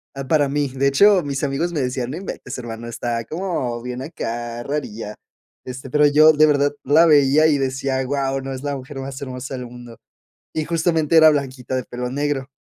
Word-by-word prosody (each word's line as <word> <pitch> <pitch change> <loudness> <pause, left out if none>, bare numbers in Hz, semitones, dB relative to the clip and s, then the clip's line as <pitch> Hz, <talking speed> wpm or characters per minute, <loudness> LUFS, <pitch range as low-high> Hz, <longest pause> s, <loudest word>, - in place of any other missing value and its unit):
ah, 135 -1 -6
para 145 0 +3
mí. 145 0 0
De 140 +1 +2
hecho, 195 +8 +5
mis 140 0 -3
amigos 145 +5 -1
me 150 - -1
decían: 125 -1 -2
"no 155 - -5
inventes 190 - -7
hermano, 115 -1 -7
está 115 0 -3
como 155 - -3
bien 125 0 -5
acá, 120 -5 -5
rarilla". 115 -7 -5 0.5
Este, 130 +1 -8
pero 150 +3 +3
yo 155 +2 +6
de 155 +1 +5
verdad, 145 -1 +2
la 155 +5 +5
veía 145 0 +5
y 150 -2 +3
decía: 135 0 -1
"guau, 135 0 -1
¿no? 135 0 -6
Es 130 +1 -7
la 145 -1 -2
mujer 135 +1 -9
más 135 0 -7
hermosa 130 -1 -6
del 125 -1 -6
mundo". 120 -1 -12 0.6
Y 155 - -1
justamente 165 -1 +1
era 160 -1 +8
blanquita, 130 -4 -3
de 130 - -2
pelo 125 0 -5
negro. 140 0 -2
135 Hz, 200 wpm, -21 LUFS, 125-150 Hz, 0.6 s, era